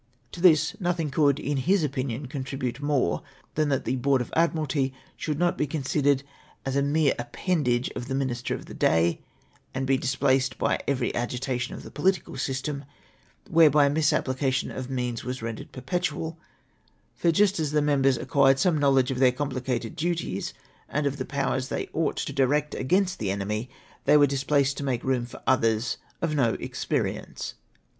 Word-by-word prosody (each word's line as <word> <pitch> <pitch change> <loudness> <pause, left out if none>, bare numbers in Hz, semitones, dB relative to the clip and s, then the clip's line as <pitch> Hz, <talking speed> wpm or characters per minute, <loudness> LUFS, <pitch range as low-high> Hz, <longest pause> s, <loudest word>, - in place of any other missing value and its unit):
" - - -40
To 175 - -8
this 165 -5 +5
nothing 175 -5 -1
could, 145 -1 +3
in 145 +1 -1
his 180 +7 +2
opinion, 135 -2 -2
contribute 130 -1 -4
more 140 -11 +1 0.3
tlian 155 -1 +1
that 135 -2 0
the 130 - 0
Board 135 +1 +2
of 125 - -5
Admiralty 150 -5 +1 0.2
should 150 -2 -3
not 175 +1 +1
be 150 - +1
considered 140 -1 +1 0.4
as 135 0 -2
a 140 - +3
mere 145 +1 +3
appendage 125 0 0
to - - -4
the 130 +2 -4
minlstei' 125 -3 -1
of - - -9
the - - -10
day, 80 +1 +2 0.5
and 130 0 -1
he 135 0 +3
dis 130 +1 -1
pjlaced 130 -1 +2
by - - +1
every 130 -3 0
agitation 125 +1 -2
of - - -9
the - - -10
political 190 -6 0
system 135 +2 -3 0.3
— - - -31
whereliy 150 -3 +6
misapplication 135 -4 +1
of 130 0 -6
means 125 -2 -2
was 125 -2 -5
rendered 115 -1 -5
perpetual; 160 +3 -3 0.7
for, 170 - +2
just 195 +2 +3
as 155 -2 0
the 150 +1 +2
members 135 -3 +3
acquired 135 0 +3
some 160 +1 +2
knowledge 135 -2 +3
of 130 - -2
their 130 -1 +6
complicated 130 -2 -3
duties, 170 - -2 0.3
and 150 0 -1
of 140 0 0
the 130 - -3
powers 135 -2 -1
they - - -2
ouglit 160 -1 0
to 140 - -5
direct 145 +2 +1
against 185 +7 +1
the 100 - -1
enemy, 105 +5 -2 0.4
they 150 - +6
were 145 - +7
then 140 - -3
displaced, 140 0 +1
to - - -3
make 130 -4 -1
ri>om 125 -2 0
for - - -12
others 115 -2 +2 0.3
of 165 -2 +1
no 125 -6 +2
experience. - - -3
135 Hz, 180 wpm, -26 LUFS, 130-150 Hz, 0.7 s, were